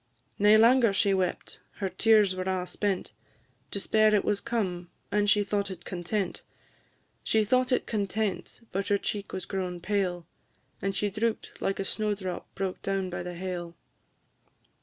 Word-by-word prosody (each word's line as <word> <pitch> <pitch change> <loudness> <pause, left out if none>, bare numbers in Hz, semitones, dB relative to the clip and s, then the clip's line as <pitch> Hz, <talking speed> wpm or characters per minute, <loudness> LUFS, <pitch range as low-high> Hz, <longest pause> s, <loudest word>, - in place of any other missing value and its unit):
Nae 210 +1 +7
langer 230 0 +6
she 195 0 +3
wept, 185 -2 -2
her 195 - -3
tears 210 -1 +4
were 185 - -3
a' 185 -1 -1
spent; 195 0 -2 0.6
Despair 215 +1 +3
it 205 - +2
was 205 -1 +1
come, 180 -7 -2 0.2
and 205 0 +2
she 205 0 +4
thought 200 0 -1
it 185 -2 -8
content; 185 +2 -2 0.8
She 220 -1 +3
thought 255 +3 +2
it 250 - +2
content, 215 +2 -2
but 195 +1 -2
her 205 - +3
cheek 200 0 -4
was 185 - -4
grown 180 -2 -3
pale, 180 -2 -1 0.6
And 195 0 -1
she 205 +1 0
droop'd 220 +2 -1
like 195 - -1
a 195 - -1
snow 210 +1 0
drop 185 -3 -5
broke 190 -1 -3
down 195 -1 -1
by 175 - -3
the 175 0 -6
hail. 175 -1 -5
195 Hz, 160 wpm, -28 LUFS, 185-210 Hz, 0.8 s, Nae